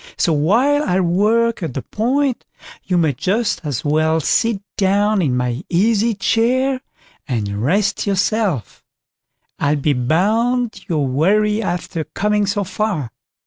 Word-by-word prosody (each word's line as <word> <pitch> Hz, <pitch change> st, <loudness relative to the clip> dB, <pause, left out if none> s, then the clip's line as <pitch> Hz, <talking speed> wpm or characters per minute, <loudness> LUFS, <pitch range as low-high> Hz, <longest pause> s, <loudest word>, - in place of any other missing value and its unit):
So 165 Hz, -, +2 dB
while 230 Hz, -, +2 dB
I 185 Hz, -8 st, +1 dB
work 210 Hz, +6 st, +1 dB
at 160 Hz, -7 st, -4 dB
the 135 Hz, -, -3 dB
point, 260 Hz, +4 st, -1 dB, 0.4 s
you 180 Hz, -, 0 dB
may 160 Hz, -4 st, +2 dB
just 200 Hz, -, -1 dB
as 145 Hz, -3 st, -4 dB
well 155 Hz, +2 st, +2 dB
sit 225 Hz, +7 st, +1 dB, 0.2 s
down 205 Hz, +1 st, +2 dB
in 130 Hz, -7 st, 0 dB
my 125 Hz, +3 st, -2 dB
easy 215 Hz, +5 st, +2 dB
chair 255 Hz, +5 st, +1 dB, 0.5 s
and 105 Hz, -6 st, -2 dB
rest 200 Hz, -, 0 dB
yourself; 200 Hz, -, -1 dB, 0.8 s
I'll 145 Hz, +1 st, +1 dB
be 145 Hz, 0 st, +1 dB
bound 220 Hz, -, 0 dB
you're 155 Hz, -4 st, 0 dB
weary 210 Hz, +11 st, +2 dB
after 175 Hz, -3 st, -3 dB
coming 210 Hz, +4 st, -1 dB
so 205 Hz, +1 st, 0 dB
far." 185 Hz, -, -2 dB
195 Hz, 135 wpm, -19 LUFS, 150-220 Hz, 0.8 s, So